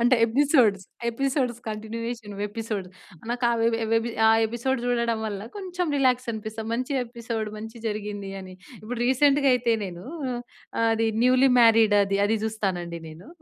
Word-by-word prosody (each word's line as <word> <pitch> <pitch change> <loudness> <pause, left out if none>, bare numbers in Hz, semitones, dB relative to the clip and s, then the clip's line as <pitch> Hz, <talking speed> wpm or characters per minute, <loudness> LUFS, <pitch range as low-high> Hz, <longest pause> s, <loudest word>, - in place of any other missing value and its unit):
అంటే 245 +2 +4
episodes 235 - +3 0.3
episodes, 255 -1 -1
continuation 220 0 -5
episodes. 210 -4 -4 0.4
నాకు 245 +1 -1
ఆ - - +2
వె 230 - +4 0.6
ఆ - - +7 0.2
ఎపిసోడ్ 240 +3 -2
చూడడం 235 -2 +1
వల్ల 205 -2 -4 0.2
కొంచెం 360 -3 -3
రిలాక్సనిపిస్తది. 230 -4 -1
మంచిగనిపిస్తది 235 -4 -3
మంచి 225 +2 -8
జరిగింది 205 -2 -5
అని. 185 -1 -10 0.3
ఇప్పుడు 235 +2 -5
రీసెంట్‍గా 280 +2 +4
అయితే 235 -2 +2
నేనూ 180 +3 -8 0.9
అది 225 0 +1 0.2
న్యూలీ 255 +1 +5
మ్యారీడ్ 225 -2 +6
అది 195 0 0
అది 220 +2 +1
జూస్తానండి 185 -6 -3
నేను. 160 - -12
230 Hz, 130 wpm, -25 LUFS, 210-250 Hz, 0.9 s, ఆ